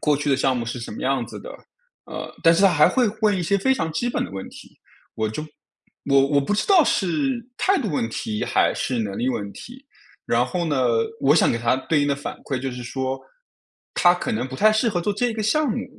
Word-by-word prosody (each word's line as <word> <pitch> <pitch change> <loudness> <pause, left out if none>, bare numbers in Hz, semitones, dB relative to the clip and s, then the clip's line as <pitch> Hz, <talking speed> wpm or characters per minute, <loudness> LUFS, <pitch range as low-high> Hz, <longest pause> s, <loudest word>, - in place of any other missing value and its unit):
过 150 -1 +2
去 145 +1 -1
的 135 - +3
项 135 -1 +1
目 120 - -2
是 115 +2 -5
什 115 - -7
么 - - -8
样 130 -2 0
子 - - -9
的。 - - -9 0.5
呃， - - -7
但 165 - +5
是 170 - +2
他 195 - +7
还 150 -4 +5
会 255 - +2 0.2
问 210 -2 +3
一 180 - -2
些 200 +4 +1
非 265 +7 +2
常 160 -10 -2
基 240 - -1
本 - - -1
的 90 - -8
问 95 0 -7
题， - - -15 0.4
我 110 0 -1
就 110 +8 -5 0.6
我 140 -1 +4
我 145 -1 +3
不 140 - -2
知 210 - 0
道 375 -6 +6
是 240 - 0
态 390 -2 +2
度 230 - -2
问 130 -7 -1
题 110 -1 -3
还 - - +2
是 125 -3 -2
能 100 -3 -4
力 125 - 0
问 105 -5 -3
题。 255 +3 -12 0.4
然 - - +1
后 180 -2 -2
呢， 150 -4 -1 0.4
我 140 +2 +4
想 160 - +4
给 115 - -1
他 115 +1 +2
对 145 +3 0
应 145 - +1
的 140 - +1
反 140 - -6
馈 135 - -2
就 135 +1 -3
是 125 0 -7
说， 130 +2 -3 0.7
他 175 0 +4
可 180 - -4
能 115 +4 -1
不 130 - -9
太 215 +10 +4
适 220 +2 +2
合 190 -5 -1
做 205 +4 -1
这 210 +5 0
一 - - -3
个 220 -1 -3
项 295 +8 +1
目。 - - -2
150 Hz, 275 characters per minute, -23 LUFS, 130-210 Hz, 0.7 s, 他